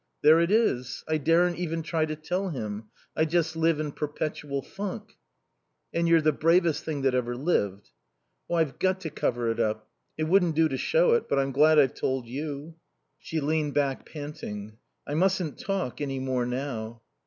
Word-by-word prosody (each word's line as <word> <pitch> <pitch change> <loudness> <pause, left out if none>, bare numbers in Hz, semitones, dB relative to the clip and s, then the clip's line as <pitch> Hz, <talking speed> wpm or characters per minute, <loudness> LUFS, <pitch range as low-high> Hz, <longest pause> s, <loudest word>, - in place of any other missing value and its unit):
"There 155 +2 +7
it 170 +1 +2
is. 160 - +1
I 155 0 +1
daren't 170 +4 +3
even 165 -2 -2
try 160 -1 0
to 155 - -3
tell 180 +5 -2
him. 110 -7 -5 0.3
I 160 - +3
just 160 0 0
live 165 -1 +2
in 150 -1 -2
perpetual 145 -2 -3
funk." 205 +2 -6 0.8
"And 170 0 +1
you're 165 -1 +5
the 155 - +4
bravest 165 +2 +2
thing 150 -4 -3
that 135 -1 +3
ever 120 -1 0
lived." 100 - -1 0.6
"Oh, 175 - 0
I've 160 -5 0
got 185 0 +1
to 160 -4 -5
cover 120 -3 0
it 115 - -4
up. 110 0 -1 0.3
It 155 - -1
wouldn't 175 0 +3
do 160 0 +4
to 135 - -2
show - - +3
it. 470 - +1
But - - +1
I'm 135 0 +1
glad 155 +3 +5
I've 135 -4 +5
told 130 -2 -2
you." 145 +4 -6 0.4
She 160 - -3
leaned 150 0 0
back, 140 -2 0
panting. 110 -8 -7 0.3
"I 145 - -4
mustn't 180 -2 +1
talk 190 -10 -3
any 135 -2 -2
more 130 -2 -1
now." 120 -3 -4
155 Hz, 185 wpm, -27 LUFS, 130-165 Hz, 0.8 s, There